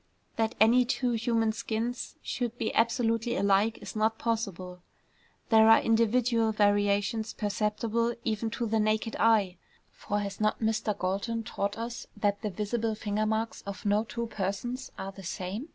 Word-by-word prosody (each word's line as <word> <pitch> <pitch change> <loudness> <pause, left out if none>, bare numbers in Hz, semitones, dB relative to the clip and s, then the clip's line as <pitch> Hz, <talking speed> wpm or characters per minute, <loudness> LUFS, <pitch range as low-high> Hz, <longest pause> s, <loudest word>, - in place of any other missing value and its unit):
That 225 +1 0
any 235 +4 +6
two 245 0 0
human 230 -1 +1
skins 230 +2 -3
should 240 -2 -3
be 220 - -2
absolutely 230 0 +1
alike 200 +3 +2
is - - -8
not 220 +1 +1
possible. 190 -6 -3 0.7
There 220 -1 +6
are 225 - +8
individual 230 0 +2
variations 205 +1 +1
perceptible 220 +3 -1
even 220 +1 -1
to 235 +1 -3
the 220 0 +1
naked 215 +1 0
eye, 210 -5 +3 0.3
for 205 - -3
has 200 0 -5
not 215 0 +1
Mr. 220 -2 0
Galton 200 +5 -2
taught 200 -2 -3
us 235 +1 -5
that 205 -1 0
the 215 - -2
visible 215 +3 -2
finger 210 0 -1
marks 220 +1 -2
of 200 0 -6
no 205 +1 +3
two 235 +1 -4
persons 220 +5 -4
are 195 - -5
the 195 - -12
same? 190 - -5
220 Hz, 155 wpm, -29 LUFS, 205-230 Hz, 0.7 s, are